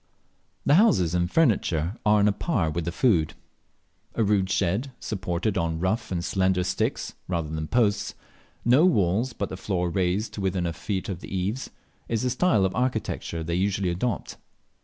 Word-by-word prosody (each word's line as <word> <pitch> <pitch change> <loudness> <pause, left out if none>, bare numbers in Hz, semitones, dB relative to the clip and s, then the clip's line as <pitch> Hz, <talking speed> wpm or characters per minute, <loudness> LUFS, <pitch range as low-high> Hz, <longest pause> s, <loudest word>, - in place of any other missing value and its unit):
The 140 - +4
houses 105 - +4
and 85 0 +1
furniture 95 - +2
are 105 0 +6
on 105 0 +4
a - - +4
par 100 - -1
with 85 +1 -3
the 85 - -1
food. 90 -6 +2 0.8
A 115 - +2
rude 100 -2 +2
shed, 100 +7 0
supported 95 0 -2
on 80 -1 -1
rough 110 +5 -1
and 85 -1 -2
slender 95 0 +1
sticks - - -2
rather 85 -4 -2
than 80 0 -3
posts, 100 +1 +1 0.5
no 125 +7 +5
walls, 115 - +2
but 100 - -3
the 95 - -6
floor 90 -3 -1
raised 95 +4 0
to 105 - -5
within 95 -2 0
a 85 - -1
foot 95 +4 -3
of 95 -4 -4
the - - -10
eaves, 95 +7 -2 0.4
is 115 0 0
the 125 - +1
style 125 - +3
of 95 - -1
architecture 110 -9 -2
they 85 +1 -3
usually 95 +1 0
adopt. 100 +5 -2
95 Hz, 180 wpm, -26 LUFS, 85-110 Hz, 0.8 s, are